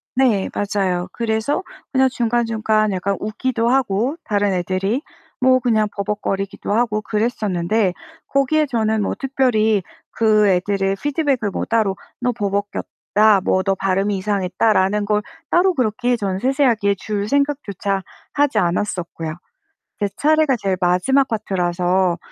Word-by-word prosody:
네 240 -7 +2
맞아요. 190 -3 -1
그래서 230 +9 -1 0.3
그냥 265 -1 +3
중간중간 225 -3 +1
약간 195 +1 -1
웃기도 230 +2 -1
하고 255 +2 +1
다른 205 -2 +1
애들이 190 - -1 0.4
뭐 255 0 +4
그냥 220 -4 +2
버벅거리기도 200 0 -3
하고 220 -2 +1
그랬었는데 210 -3 0 0.3
거기에 290 +3 +2
저는 220 -4 0
뭐 - - -1
특별히 235 -6 +1 0.3
그 215 -2 +3
애들의 195 +1 +1
피드백을 280 -7 0
뭐 - - -3
따로 215 -4 +1 0.2
"너 245 0 0
버벅였다." 205 0 +1
뭐 185 0 +2
"너 195 -1 +1
발음이 195 +1 0
이상했다."라는 200 +1 +1
걸 210 0 +1 0.3
따로 365 +1 +3
그렇게 245 -1 0
저는 195 -3 -2
세세하게 245 -6 +2
줄 205 0 -3
생각조차 275 -9 -1 0.3
하지 290 -1 +1
않았었고요. 170 -3 -1 0.6
제 205 -1 0
차례가 310 -2 +3
제일 190 -2 -1
마지막 185 +11 +3
파트라서 180 -3 0
210 Hz, 305 characters per minute, -20 LUFS, 195-245 Hz, 0.6 s, 뭐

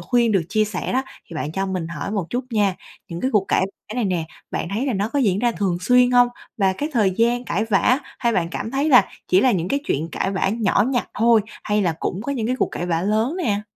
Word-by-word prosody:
khuyên 235 -3 +2
được 190 -4 +2
chia 215 +1 +2
sẻ 205 0 -4
đó, 260 +1 +1 0.3
thì 165 - -8
bạn 155 +1 -3
cho 195 +1 -1
mình 185 -3 -3
hỏi 165 +3 -5
một 195 -6 -2
chút 245 +1 -2
nha. 205 -4 +2 0.3
Những 170 0 -6
cái 260 - 0
cuộc 210 -5 +2
cãi - - +3 0.2
vã 215 - -6
này 245 -3 0
nè, 180 -4 0 0.3
bạn 170 - -3
thấy 250 +6 -1
là 260 - 0
nó 205 +1 -1
có 285 +4 -1
diễn 200 -7 +2
ra 240 +1 +1
thường 190 -5 -1
xuyên 250 +4 +4
hông? 245 0 +5 0.3
Và 195 -3 +2
cái 290 +11 -3
thời 210 -6 +3
gian 235 +5 +1
cãi 200 +3 -1
vã 225 +4 +3 0.2
hay 235 -1 +1
bạn 170 -4 0
cảm 220 - -4
thấy 280 +3 0
là 245 -8 +7 0.2
chỉ 185 +1 +5
là 255 - +4
những 180 -1 -1
cái 280 - 0
chuyện 155 - -1
cãi 190 - -1
vã 195 0 0
nhỏ 210 -1 +2
nhặt 245 -3 -1
thôi 230 -1 +5 0.2
hay 210 0 +1
là 170 -3 +1
cũng 190 - -3
có 280 +4 -2
những 230 -5 -2
cái 255 +1 0
cuộc - - +1
cãi 175 - -3
vã 170 -1 0
lớn 220 - 0
nè? 210 - 0
215 Hz, 270 wpm, -22 LUFS, 190-245 Hz, 0.3 s, là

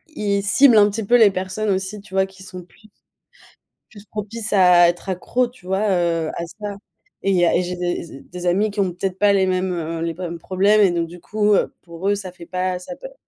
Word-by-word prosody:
ils 200 -5 -1
ciblent 235 +3 +5
un 205 0 +6
petit 215 +2 -4
peu 240 - +3
les 220 -4 +6
personnes 190 +3 -3
aussi, 190 +2 -2
tu 200 -1 -17
vois, 190 0 +3
qui 190 0 -15
sont 185 -1 -9
plus 215 +5 -22 1.0
plus 205 -2 -14
propices 215 +1 -5
à 180 -3 +6
être 175 +3 -5
accro, 240 +7 0
tu 240 -7 -17
vois, 195 +3 0
heu, 170 -3 0
à 170 - -4
ça. 205 -1 -5 0.4
Et 195 - -1
il 190 - +2
y 175 - +4
a - - +2
et - - +2
j'ai 180 0 -4
des 175 -5 -4
des 180 0 -9
amis 200 +4 +2
qui 205 - -6
ont 190 -2 +1
peut-être 185 +1 -4
pas 205 -1 +4
les 195 -1 +3
mêmes, 185 0 0
heu, 165 -1 -4
les 165 0 -2
mêmes 170 -1 -6
problèmes, 200 +5 +2
et 200 - +5
donc, 170 -1 -1
du 175 +2 -12
coup, 210 +3 +1
heu, - - +1
pour 175 +3 -4
eux, 205 - +2
ça 195 -2 -7
fait 175 -1 -13
pas 185 0 -2
ça 185 +9 -8
a - - -11
pas - - -11
190 Hz, 250 wpm, -21 LUFS, 180-205 Hz, 1.0 s, un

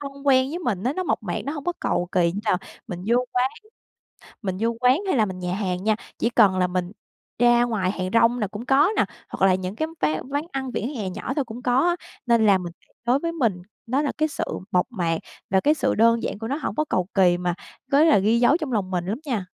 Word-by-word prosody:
thân 280 -1 -6
quen 260 -1 +4
với 335 - -3
mình 220 - -2
á, 255 - +1
nó 370 - -2
mộc 355 - -1
mạc, 175 -5 -3
nó 280 - -3
hông 290 -3 -6
có 350 - 0
cầu 175 0 0
kỳ 170 -2 +3
như 200 - -4
là 210 - +2 0.3
mình 180 -1 -6
vô 235 +2 +3 0.2
quán 250 +1 +2 0.9
mình 190 -3 -2
vô 230 +1 +1
quán 255 +3 +4
hay 370 - +2
là 220 -3 +3
mình 185 -2 -6
nhà 180 0 -2
hàng 185 -2 -2
nha. 215 0 +2 0.2
Chỉ 235 - +1
cần 205 -6 +4
là 180 - +3
mình 180 0 -3 0.5
ra 240 0 +5
ngoài 215 -6 0
hàng 185 -2 -3
rong 230 +1 +4
là 215 - 0
cũng 210 +5 -8
có 275 +7 +4
nè, - - +4 0.2
hoặc 195 - +1
là 185 - +4
những 185 +2 -4
cái 315 +6 -1
ván 155 +10 -1
quán 285 +2 -1
ăn 265 -1 -3
vỉa - - -2
hè 235 -6 -3
nhỏ 195 +4 -4
thôi 285 - 0
cũng 235 +1 -9
có 250 0 +2
á, 350 - +1 0.3
nên 235 -2 +4
là 200 -2 +5
mình 175 -2 -6 0.3
đối 245 +3 +3
với 335 +3 -3
mình 230 - 0 0.2
nó 260 +5 +1
là 290 - -1
cái 310 0 +2
sự - - -3 0.3
mộc 180 -1 +3
mạc, 170 -8 -1 0.3
và 190 0 +4
cái 295 +9 +3
sự 285 - 0
đơn 230 +1 +4
giản - - -3
của 225 +1 -5
nó 275 - -1
hổng 310 - -3
có 305 - +1
cầu 180 -1 0
kỳ, 180 -3 +4
mà 180 -1 -1 0.4
có 280 +2 +6
là 315 -7 +6
ghi 215 +4 +3
dấu 245 +5 +5
trong 310 -6 -4
lòng 200 -5 -1
mình 175 -2 -2
lắm 210 +5 -2
nha. 220 -9 -2
225 Hz, 265 wpm, -24 LUFS, 185-265 Hz, 0.9 s, có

